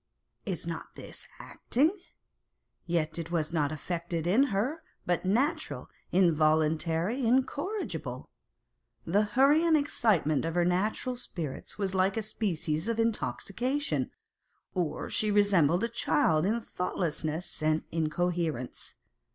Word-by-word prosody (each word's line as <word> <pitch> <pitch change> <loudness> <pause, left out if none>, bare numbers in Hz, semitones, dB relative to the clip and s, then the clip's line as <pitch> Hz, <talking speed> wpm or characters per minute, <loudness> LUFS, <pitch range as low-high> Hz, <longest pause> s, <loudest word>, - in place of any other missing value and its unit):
Is 180 -4 -2
not 165 -1 -6
this - - -8
like - - -10
acting? 290 +7 +2 1.0
Yet 165 -1 0
it 165 -1 -5
was 165 -2 -1
not 150 -3 +1
affected 170 +1 -3
in 215 +11 +4
her, 260 +8 -1 0.2
but 175 +1 0
natural, 285 - 0 0.2
involuntary, 160 - +2
in 250 +3 +4
corrigible. 380 +11 -4 0.8
The 195 +5 +3
hurry 275 +9 +4
and 330 -2 +5
excitement 205 - +2
of 165 +1 -2
her 175 -1 +3
natural 210 +8 0
spirits 165 - -5
was 195 -2 -1
like 190 +2 +2
a 220 - 0
species 175 -5 -1
of 230 0 -1
intoxication, 240 +4 -1 0.6
or 175 -5 -2
she 215 - +1
resembled 195 -4 +4
a - - +2
child 170 -7 +2
in 225 +3 +1
thoughtlessness 170 -4 -3
and 155 0 +2
incoherence. 165 -4 -2
180 Hz, 125 wpm, -29 LUFS, 160-230 Hz, 1.0 s, and